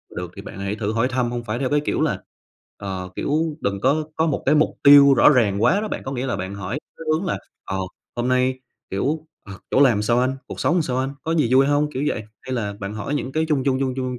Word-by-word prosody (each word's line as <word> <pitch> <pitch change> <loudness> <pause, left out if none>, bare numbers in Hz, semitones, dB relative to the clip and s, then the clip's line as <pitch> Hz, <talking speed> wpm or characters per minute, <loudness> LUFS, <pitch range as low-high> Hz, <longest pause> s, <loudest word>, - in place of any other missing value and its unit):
được 90 -1 -5
thì 100 - -8
bạn 95 - -9
hãy 100 +1 -2
thử 105 0 -2
hỏi 115 +3 +2
thăm, 125 -2 -1
hông 120 -1 -4
phải 120 +1 -3
theo 130 -2 -1
cái 145 0 +2
kiểu - - 0
là - - 0 0.6
ờ, 95 -2 -5
kiểu 155 +1 -1
đừng 100 -1 -1
có 145 +4 +2
có 160 - +2
một 145 - -1
cái 150 +3 +4
mục 150 - +2
tiêu 140 -1 +9
rõ 120 - +6
ràng 110 -7 +2
quá 195 +11 +4
đó 215 - -3
bạn. - - -5
Có 130 - -4
nghĩa 130 -1 -2
là 125 - -1
bạn 95 +1 -5
hỏi 100 +6 -4 0.2
cái 165 - -9
hướng 165 +5 -1
là, 170 - -1 0.3
ờ, 95 - -3 0.4
"Hôm 120 +1 -1
nay, 130 0 +1 0.3
kiểu, 150 +11 -2 0.2
ờ, 95 - -9 0.2
chỗ 135 - +4
làm 120 -7 +4
sao 120 +3 +2
anh?", 130 +1 +1
"Cuộc - - -7
sống 175 0 +2
sao 130 -5 -2
anh?", 130 +1 0
"Có 160 - -2
gì 150 -6 +3
vui 135 +1 +6
hông?", 145 +1 +1
kiểu 135 0 -3
vậy. 110 - -2 0.2
Hay 130 - -5
là 105 -5 -2
bạn 100 +1 -5
hỏi 110 +7 -3
những 135 -2 -3
cái 160 +3 0
chung 140 -4 +1
chung, 130 -1 +1
chung 130 -1 0
chung, 130 -1 -2
130 Hz, 270 wpm, -22 LUFS, 105-145 Hz, 0.6 s, tiêu